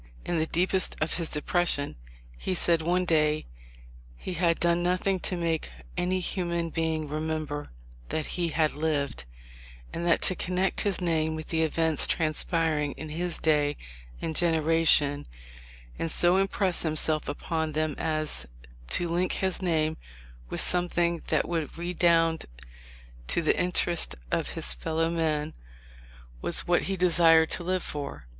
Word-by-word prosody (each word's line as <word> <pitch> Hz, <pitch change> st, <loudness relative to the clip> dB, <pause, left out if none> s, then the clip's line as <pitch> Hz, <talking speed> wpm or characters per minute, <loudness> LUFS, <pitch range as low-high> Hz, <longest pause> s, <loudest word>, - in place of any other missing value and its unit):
In 175 Hz, -, -1 dB
the 160 Hz, -, 0 dB
deepest 185 Hz, +2 st, 0 dB
of 155 Hz, +1 st, -1 dB
his 170 Hz, -2 st, -2 dB
depression 150 Hz, -1 st, 0 dB, 0.4 s
he 185 Hz, -, -3 dB
said 170 Hz, -1 st, +4 dB
one 180 Hz, +3 st, +1 dB
day 155 Hz, -2 st, +2 dB, 0.7 s
he 180 Hz, -, -5 dB
had 170 Hz, -1 st, +1 dB
done 170 Hz, 0 st, +2 dB
nothing 185 Hz, +2 st, +1 dB
to 180 Hz, -, -2 dB
make 165 Hz, -2 st, -1 dB, 0.3 s
any 180 Hz, +1 st, 0 dB
human 170 Hz, -2 st, -2 dB
being 160 Hz, -1 st, -1 dB
remember 155 Hz, -1 st, -3 dB, 0.4 s
that 155 Hz, -, -2 dB
he 175 Hz, -1 st, -2 dB
had 155 Hz, -1 st, +1 dB
lived; 145 Hz, -, -2 dB, 0.7 s
and 170 Hz, -, -3 dB
that 170 Hz, -, +3 dB
to -, -, +3 dB
connect 185 Hz, +1 st, -1 dB
his 200 Hz, -3 st, 0 dB
name 160 Hz, -2 st, 0 dB
with 155 Hz, 0 st, -7 dB
the 160 Hz, -1 st, 0 dB
events 160 Hz, -1 st, +2 dB
transpiring 155 Hz, -2 st, 0 dB
in 155 Hz, -, -8 dB
his 170 Hz, +2 st, -3 dB
day 145 Hz, -2 st, +1 dB, 0.4 s
and 160 Hz, -, -4 dB
gen 170 Hz, -1 st, +3 dB
eration, 155 Hz, -2 st, +3 dB, 0.7 s
and 165 Hz, -, -1 dB
so 175 Hz, +3 st, +4 dB
impress 195 Hz, -2 st, +1 dB
himself 155 Hz, -1 st, 0 dB
upon 160 Hz, +1 st, -2 dB
them 155 Hz, 0 st, 0 dB
as 155 Hz, -, -2 dB, 0.4 s
to 175 Hz, -, +3 dB
link 175 Hz, +2 st, 0 dB
his 190 Hz, -1 st, -1 dB
name 160 Hz, -3 st, 0 dB, 0.5 s
with -, -, -1 dB
something 175 Hz, -1 st, +1 dB
that -, -, +1 dB
would 165 Hz, -3 st, -3 dB
redound 170 Hz, -2 st, +2 dB, 0.8 s
to 170 Hz, -, +1 dB
the 155 Hz, -, +3 dB
interest 175 Hz, -1 st, +1 dB, 0.2 s
of -, -, -1 dB
his 65 Hz, -, 0 dB
fellow 160 Hz, -, -1 dB
men, 155 Hz, -3 st, -1 dB, 0.9 s
was -, -, +1 dB
what 175 Hz, 0 st, +3 dB
he 195 Hz, 0 st, -2 dB
desired 165 Hz, -2 st, +5 dB
to 175 Hz, -, -1 dB
live 185 Hz, +1 st, -1 dB
for." 140 Hz, -, -6 dB
165 Hz, 150 wpm, -27 LUFS, 155-175 Hz, 0.9 s, desired